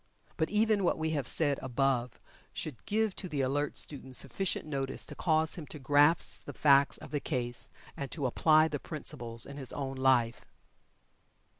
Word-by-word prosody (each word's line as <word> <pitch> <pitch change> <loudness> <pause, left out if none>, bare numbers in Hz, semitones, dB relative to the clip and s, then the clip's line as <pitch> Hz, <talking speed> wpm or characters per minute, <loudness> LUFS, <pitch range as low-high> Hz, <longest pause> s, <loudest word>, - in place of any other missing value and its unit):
But 160 - 0
even 210 -1 +2
what 175 - +2
we 160 0 -1
have 145 -5 -2
said 145 -4 +2
above, 130 -1 0 0.4
should 145 -7 -6
give 215 -1 +1
to 185 - -5
the 145 -3 -1
alert 140 +3 -1
student 130 -3 -2
sufficient 175 +9 -1
notice 135 -3 -3
to - - -7
cause 160 -2 +1
him 160 -4 -7
to - - -7
grasp 145 +4 +2
the - - -7
facts 140 -1 +4
of - - -12
the 145 - -1
case, 125 -4 -1 0.3
and 140 -1 -5
to 145 -5 -3
apply 155 +5 +4
the 145 -2 -4
principles 120 -8 -3
in 140 - -9
his 135 -3 +2
own 135 -1 -4
life. 130 -3 +2
145 Hz, 175 wpm, -31 LUFS, 130-160 Hz, 0.4 s, facts